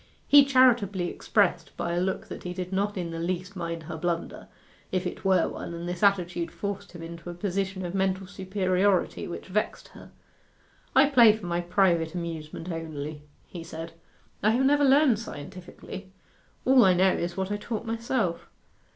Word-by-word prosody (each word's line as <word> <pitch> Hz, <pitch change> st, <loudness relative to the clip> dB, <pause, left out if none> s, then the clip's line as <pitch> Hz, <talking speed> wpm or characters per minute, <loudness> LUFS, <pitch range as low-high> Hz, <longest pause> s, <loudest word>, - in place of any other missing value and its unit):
He 285 Hz, -1 st, +8 dB
charitably 235 Hz, -9 st, +3 dB
expressed 180 Hz, -5 st, 0 dB
by 170 Hz, -, -2 dB
a 175 Hz, -, 0 dB
look 190 Hz, +1 st, -1 dB
that -, -, -8 dB
he 180 Hz, 0 st, -6 dB
did 180 Hz, 0 st, -5 dB
not 200 Hz, +1 st, 0 dB
in 170 Hz, -2 st, -3 dB
the 165 Hz, -, -5 dB
least 180 Hz, +3 st, -3 dB
mind 170 Hz, -2 st, -4 dB
her 160 Hz, +1 st, -6 dB
blunder, 170 Hz, +1 st, -3 dB, 0.4 s
if 185 Hz, 0 st, -1 dB
it 180 Hz, -, -5 dB
were 190 Hz, -3 st, +3 dB
one; 170 Hz, -, -6 dB
and 170 Hz, +1 st, -6 dB
this 175 Hz, 0 st, -4 dB
attitude 180 Hz, -4 st, +2 dB
forced 200 Hz, -1 st, -5 dB
him 170 Hz, -2 st, -9 dB
into 170 Hz, +1 st, -8 dB
a 175 Hz, -, -6 dB
position 190 Hz, 0 st, -2 dB
of 175 Hz, -, -5 dB
mental 190 Hz, 0 st, 0 dB
superiority 190 Hz, 0 st, 0 dB
which 175 Hz, -, -7 dB
vexed 210 Hz, +3 st, -2 dB
her. -, -, -14 dB, 0.9 s
'I 270 Hz, +2 st, +6 dB
play 235 Hz, -6 st, +7 dB
for 210 Hz, -, -9 dB
my 175 Hz, 0 st, -1 dB
private 175 Hz, -2 st, +2 dB
amusement 165 Hz, 0 st, -5 dB
only,' 155 Hz, -2 st, -5 dB, 0.2 s
he 170 Hz, -2 st, -8 dB
said. 165 Hz, 0 st, -7 dB, 0.5 s
'I 210 Hz, -, +3 dB
have 245 Hz, +4 st, +2 dB
never 290 Hz, +1 st, +4 dB
learned 275 Hz, -4 st, +5 dB
scientifically. 185 Hz, +1 st, -9 dB, 0.5 s
All 260 Hz, -1 st, +6 dB
I 185 Hz, -3 st, +5 dB
know 185 Hz, +1 st, +4 dB
is 175 Hz, +1 st, -3 dB
what 190 Hz, +1 st, -2 dB
I 205 Hz, -, 0 dB
taught 220 Hz, +1 st, -5 dB
myself. 225 Hz, -5 st, -2 dB
185 Hz, 175 wpm, -27 LUFS, 170-205 Hz, 0.9 s, He